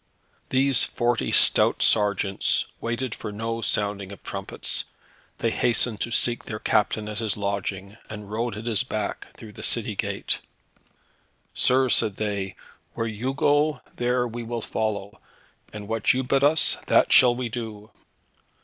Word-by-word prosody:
These 135 Hz, -1 st, +3 dB
forty 120 Hz, -1 st, 0 dB
stout -, -, +4 dB
sergeants 100 Hz, -2 st, +1 dB
waited 120 Hz, +1 st, -3 dB
for 110 Hz, -, -6 dB
no 115 Hz, +2 st, -4 dB
sounding 100 Hz, -2 st, -1 dB
of 100 Hz, -, -11 dB
trumpets; -, -, -3 dB, 0.5 s
they -, -, 0 dB
hastened 115 Hz, -2 st, +1 dB
to -, -, -1 dB
seek 120 Hz, 0 st, +2 dB
their 110 Hz, -, -5 dB
captain 105 Hz, 0 st, 0 dB
at 105 Hz, +1 st, -3 dB
his 110 Hz, -3 st, -1 dB
lodging, 100 Hz, 0 st, -4 dB
and 105 Hz, -1 st, -8 dB
rode 115 Hz, 0 st, -2 dB
at 110 Hz, -, -7 dB
his 115 Hz, -4 st, +2 dB
back 110 Hz, -5 st, -4 dB
through 110 Hz, -2 st, -11 dB
the -, -, -11 dB
city -, -, +2 dB
gate. -, -, -2 dB, 1.1 s
"Sir," 130 Hz, +1 st, +3 dB
said 110 Hz, -4 st, +2 dB
they, 100 Hz, -3 st, -3 dB, 0.4 s
"where 115 Hz, -, -2 dB
you 115 Hz, +5 st, -3 dB
go, 145 Hz, 0 st, +2 dB
there 125 Hz, 0 st, 0 dB
we 120 Hz, +1 st, -6 dB
will 115 Hz, 0 st, -4 dB
follow, 105 Hz, -2 st, -3 dB, 0.5 s
and 105 Hz, -1 st, -8 dB
what 115 Hz, +2 st, +1 dB
you 130 Hz, -, 0 dB
bid 135 Hz, +2 st, +1 dB
us, 155 Hz, +3 st, +4 dB
that -, -, +4 dB
shall 125 Hz, -1 st, +6 dB
we 125 Hz, 0 st, -3 dB
do." 110 Hz, -2 st, -7 dB
110 Hz, 150 wpm, -25 LUFS, 105-120 Hz, 1.1 s, shall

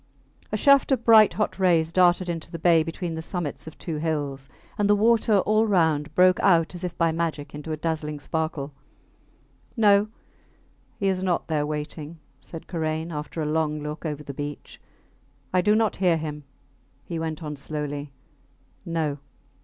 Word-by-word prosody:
A 215 Hz, -, 0 dB
shaft 280 Hz, +4 st, +5 dB
of 255 Hz, -3 st, +1 dB
bright 220 Hz, -2 st, +7 dB
hot 210 Hz, -2 st, -2 dB
rays 165 Hz, -3 st, +3 dB
darted 180 Hz, 0 st, +4 dB
into 165 Hz, -1 st, -4 dB
the 165 Hz, -, -5 dB
bay 165 Hz, 0 st, +4 dB
between 165 Hz, +1 st, -4 dB
the 160 Hz, -, -4 dB
summits 160 Hz, -3 st, -5 dB
of 160 Hz, -, -10 dB
two 160 Hz, -3 st, -4 dB
hills, 145 Hz, -4 st, -3 dB, 0.3 s
and 205 Hz, -1 st, +1 dB
the 205 Hz, -, +6 dB
water 220 Hz, 0 st, +3 dB
all 215 Hz, +3 st, +2 dB
round 160 Hz, -6 st, +1 dB
broke 185 Hz, 0 st, +5 dB
out 170 Hz, -3 st, +3 dB
as 175 Hz, 0 st, -6 dB
if 180 Hz, -1 st, -4 dB
by 165 Hz, -1 st, +2 dB
magic 160 Hz, -3 st, -3 dB
into 150 Hz, +2 st, -6 dB
a 155 Hz, -, -2 dB
dazzling 150 Hz, -2 st, -3 dB
sparkle. 155 Hz, -2 st, -3 dB, 1.0 s
No! 205 Hz, -1 st, +5 dB, 0.9 s
He 195 Hz, -, -1 dB
is 190 Hz, -1 st, 0 dB
not 180 Hz, -2 st, 0 dB
there 150 Hz, -2 st, 0 dB
waiting, 150 Hz, +1 st, -5 dB, 0.2 s
said 165 Hz, -, -8 dB
Karain, 160 Hz, -1 st, -3 dB
after 155 Hz, +1 st, -4 dB
a -, -, -2 dB
long 150 Hz, -1 st, -1 dB
look 150 Hz, +1 st, -6 dB
over 150 Hz, -2 st, -4 dB
the 140 Hz, -, -7 dB
beach. 145 Hz, +1 st, -7 dB, 0.7 s
I 185 Hz, -, +4 dB
do 210 Hz, +3 st, +3 dB
not 220 Hz, -1 st, +1 dB
hear 180 Hz, -3 st, +3 dB
him, 150 Hz, -2 st, -6 dB, 0.6 s
he 165 Hz, +1 st, -5 dB
went 160 Hz, 0 st, -4 dB
on, 150 Hz, -1 st, -5 dB
slowly. 145 Hz, 0 st, -5 dB, 0.7 s
No! 160 Hz, -5 st, -2 dB
160 Hz, 170 wpm, -25 LUFS, 150-185 Hz, 1.0 s, bright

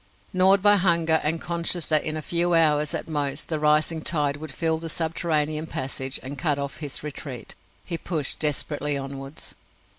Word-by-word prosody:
Gnawed 190 Hz, +1 st, +4 dB
by 205 Hz, 0 st, +7 dB
hunger, 170 Hz, -4 st, +3 dB
and 160 Hz, +2 st, 0 dB
conscious 170 Hz, 0 st, -1 dB
that 155 Hz, -2 st, +3 dB
in 155 Hz, 0 st, -2 dB
a 155 Hz, -, -5 dB
few 175 Hz, +1 st, +2 dB
hours 150 Hz, -2 st, +3 dB
at -, -, -3 dB
most 145 Hz, -3 st, -2 dB
the 155 Hz, -2 st, -1 dB
rising 155 Hz, +2 st, +2 dB
tide 145 Hz, -3 st, 0 dB
would 155 Hz, 0 st, -7 dB
fill 160 Hz, +1 st, 0 dB
the 165 Hz, 0 st, -6 dB
subterranean 160 Hz, -1 st, -1 dB
passage 130 Hz, -2 st, -3 dB
and 135 Hz, +1 st, -6 dB
cut 145 Hz, 0 st, +1 dB
off 140 Hz, -1 st, -4 dB
his 145 Hz, -2 st, -2 dB
retreat, 140 Hz, -4 st, -6 dB, 0.3 s
he 170 Hz, -2 st, -3 dB
pushed 155 Hz, -6 st, -2 dB
desperately 150 Hz, -1 st, +1 dB
onwards. 135 Hz, +1 st, -6 dB
155 Hz, 175 wpm, -25 LUFS, 145-165 Hz, 0.3 s, by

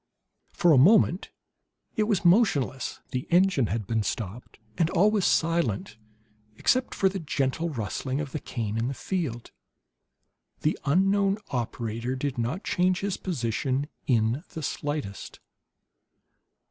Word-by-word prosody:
For 175 Hz, -, +3 dB
a 140 Hz, -, +7 dB
moment 185 Hz, -, +4 dB, 0.7 s
it 215 Hz, -4 st, +2 dB
was 200 Hz, -4 st, 0 dB
motionless; 160 Hz, -, +2 dB
the 125 Hz, 0 st, -3 dB
engine 175 Hz, -, +3 dB
had 105 Hz, +2 st, -2 dB
been 110 Hz, +2 st, 0 dB
stopped, 105 Hz, +3 st, -5 dB, 0.2 s
and 165 Hz, -2 st, +2 dB
all 195 Hz, +4 st, +4 dB
was 210 Hz, -4 st, +1 dB
silent 160 Hz, -, +1 dB, 0.6 s
except 255 Hz, -, +1 dB
for 195 Hz, -, +3 dB
the 190 Hz, 0 st, -2 dB
gentle 150 Hz, +1 st, -1 dB
rustling 130 Hz, +1 st, -3 dB
of 145 Hz, -3 st, -4 dB
the 155 Hz, -, -3 dB
cane 115 Hz, -4 st, -3 dB
in 115 Hz, -, 0 dB
the 135 Hz, -, -3 dB
field. 145 Hz, -12 st, -3 dB, 1.1 s
The 155 Hz, -, +1 dB
unknown 195 Hz, +6 st, +3 dB
operator 120 Hz, 0 st, -3 dB
did 130 Hz, -1 st, -3 dB
not 125 Hz, -, -2 dB
change 180 Hz, 0 st, +1 dB
his 200 Hz, -1 st, -2 dB
position 135 Hz, -, -2 dB, 0.2 s
in 120 Hz, +3 st, +2 dB
the 160 Hz, -, -5 dB
slightest. 145 Hz, -8 st, -4 dB
145 Hz, 135 wpm, -27 LUFS, 120-185 Hz, 1.1 s, a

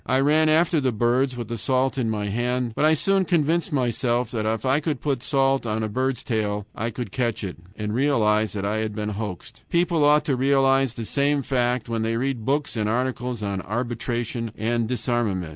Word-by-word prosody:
I 130 Hz, -, +2 dB
ran 155 Hz, +3 st, +4 dB
after 160 Hz, +1 st, +3 dB
the 130 Hz, -2 st, +1 dB
birds 120 Hz, +3 st, +1 dB
with 120 Hz, -2 st, -5 dB
the 115 Hz, 0 st, -4 dB
salt 130 Hz, +3 st, +1 dB
in 125 Hz, -4 st, -1 dB
my 105 Hz, -2 st, -2 dB
hand, 120 Hz, +3 st, -1 dB
but -, -, +2 dB
I 155 Hz, +1 st, +5 dB
soon 195 Hz, +5 st, +2 dB
convinced 170 Hz, 0 st, +1 dB
myself 120 Hz, -3 st, 0 dB
that 110 Hz, -2 st, -2 dB
if 110 Hz, +1 st, -1 dB
I 130 Hz, +3 st, +3 dB
could 150 Hz, -3 st, -2 dB
put 140 Hz, -5 st, -1 dB
salt 135 Hz, -1 st, +1 dB
on 110 Hz, 0 st, -1 dB
a -, -, 0 dB
bird's 130 Hz, +2 st, -1 dB
tail, 105 Hz, -3 st, -1 dB
I 110 Hz, +2 st, -3 dB
could 115 Hz, -3 st, -6 dB
catch 120 Hz, -3 st, -1 dB
it, 95 Hz, -3 st, -5 dB, 0.2 s
and 105 Hz, -1 st, -3 dB
realized 110 Hz, -6 st, +2 dB
that 100 Hz, -1 st, -2 dB
I 105 Hz, +2 st, 0 dB
had 110 Hz, -1 st, -2 dB
been 105 Hz, -1 st, -2 dB
hoaxed. 105 Hz, -4 st, -6 dB
People 170 Hz, -2 st, +2 dB
ought 150 Hz, +1 st, +4 dB
to 140 Hz, -4 st, +1 dB
realize 135 Hz, -1 st, +3 dB
the 115 Hz, -, -5 dB
same 140 Hz, +3 st, +1 dB
fact 125 Hz, -2 st, 0 dB
when 115 Hz, -1 st, -2 dB
they 115 Hz, +1 st, 0 dB
read 125 Hz, -3 st, -2 dB
books 140 Hz, +1 st, 0 dB
and 105 Hz, -2 st, 0 dB
articles 125 Hz, -1 st, -2 dB
on 100 Hz, -2 st, -2 dB
arbitration 120 Hz, +1 st, -3 dB
and 115 Hz, +1 st, 0 dB
disarmament. 115 Hz, -8 st, -1 dB
120 Hz, 210 wpm, -24 LUFS, 110-135 Hz, 0.2 s, I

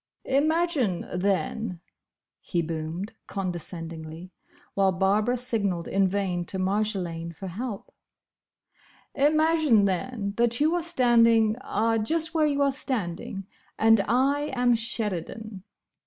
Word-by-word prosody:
"Imagine, 295 Hz, -, +1 dB
then," 185 Hz, +1 st, -1 dB, 0.6 s
he 170 Hz, -2 st, -2 dB
boomed, 165 Hz, +5 st, -5 dB
condescendingly, 170 Hz, -2 st, -6 dB, 0.4 s
while 195 Hz, -1 st, +2 dB
Barbara 205 Hz, +6 st, +1 dB
signalled 205 Hz, -9 st, +1 dB
in 195 Hz, 0 st, +2 dB
vain 185 Hz, -2 st, -1 dB
to 190 Hz, -, -4 dB
Marjolaine 185 Hz, -4 st, -2 dB
for 190 Hz, +4 st, -8 dB
help, 210 Hz, +3 st, -6 dB, 1.2 s
"Imagine, 305 Hz, -6 st, +3 dB
then, 200 Hz, +2 st, -2 dB
that 235 Hz, 0 st, +1 dB
you 310 Hz, +3 st, +3 dB
are 350 Hz, -, 0 dB
standing—ah—just 230 Hz, 0 st, +2 dB
where 310 Hz, -2 st, +3 dB
you 285 Hz, -1 st, +1 dB
are 280 Hz, -, +2 dB
standing; 195 Hz, -, -3 dB, 0.3 s
and 225 Hz, -1 st, +5 dB
I 275 Hz, +6 st, +1 dB
am 245 Hz, -1 st, +3 dB
Sheridan." 215 Hz, -3 st, -1 dB
215 Hz, 105 wpm, -26 LUFS, 185-255 Hz, 1.2 s, and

